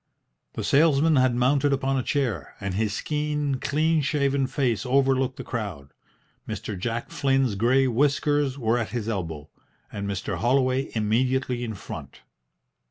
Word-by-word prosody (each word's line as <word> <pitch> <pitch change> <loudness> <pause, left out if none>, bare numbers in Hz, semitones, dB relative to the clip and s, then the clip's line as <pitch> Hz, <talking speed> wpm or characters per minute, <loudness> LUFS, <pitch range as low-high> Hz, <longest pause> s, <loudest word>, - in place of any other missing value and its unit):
The - - -4
salesman 155 +1 +4
had 130 -1 +3
mounted 140 +3 +2
upon 135 0 0
a 130 - +1
chair, 120 - -2
and 100 -1 -3
his 105 +1 -1
keen, 150 -2 -1
clean 155 +3 +1
shaven 140 -1 +1
face 125 -6 0
overlooked 135 0 +2
the - - -6
crowd. 95 - -5 0.6
Mr. 105 - -4
Jack 115 +5 -4
Flynn's 135 -4 +1
grey 120 +6 +3
whiskers 145 +2 +1
were 120 -2 +1
at 115 - -3
his 120 -3 -4
elbow, 80 -9 -4 0.4
and 100 0 -4
Mr. 100 -2 -3
Holloway 130 +2 +1
immediately 125 +3 0
in 110 -2 -4
front. 75 -7 -9
130 Hz, 145 wpm, -25 LUFS, 110-140 Hz, 0.6 s, salesman